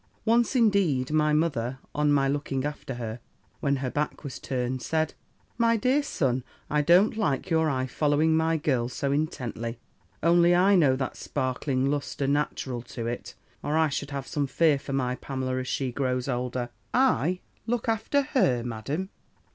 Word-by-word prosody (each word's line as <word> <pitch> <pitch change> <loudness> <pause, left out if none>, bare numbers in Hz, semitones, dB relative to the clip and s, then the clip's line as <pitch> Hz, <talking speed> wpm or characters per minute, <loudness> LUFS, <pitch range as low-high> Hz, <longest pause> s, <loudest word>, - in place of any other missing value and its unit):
"Once, 235 +3 +3
indeed, 195 - +3
my 150 0 +3
mother, 135 -6 0 0.2
on 150 0 +2
my 140 -1 +3
looking 140 -1 -1
after 145 -3 -5
her, 115 -1 -5 0.4
when 140 0 +1
her 130 -2 -3
back 150 +1 -2
was 140 -4 -6
turned, 130 -1 -2
said, 160 +2 0 0.5
'My 230 0 +4
dear 255 +6 +2
son, 130 - -1 0.3
I 150 0 +3
don't 175 +9 +5
like 155 -11 -1
your 160 -1 +3
eye 130 -2 0
following 150 +4 +2
my 160 0 +2
girl 130 -7 0
so 140 +2 -2
intently. 125 -6 -2 0.5
Only 170 +1 +5
I 190 +3 +5
know 145 -8 +4
that 130 -1 -3
sparkling 130 +1 -1
lustre 145 -1 -2
natural 135 -3 -1 0.2
to 115 - -2
it, 120 +1 -5 0.3
or 150 +2 0
I 160 -1 +3
should 140 0 -3
have 140 -2 -4
some 145 0 -1
fear 155 0 +3
for 140 - -8
my 125 -2 0
Pamela, 130 -1 -3
as 130 - -4
she 130 -1 -1
grows 125 0 -1
older.' 125 -1 -2 0.3
"'I 185 - +2 0.3
look 240 0 -1
after 225 +6 +1
her. 135 - +2
Madam! 135 - -4
145 Hz, 170 wpm, -27 LUFS, 130-165 Hz, 0.5 s, don't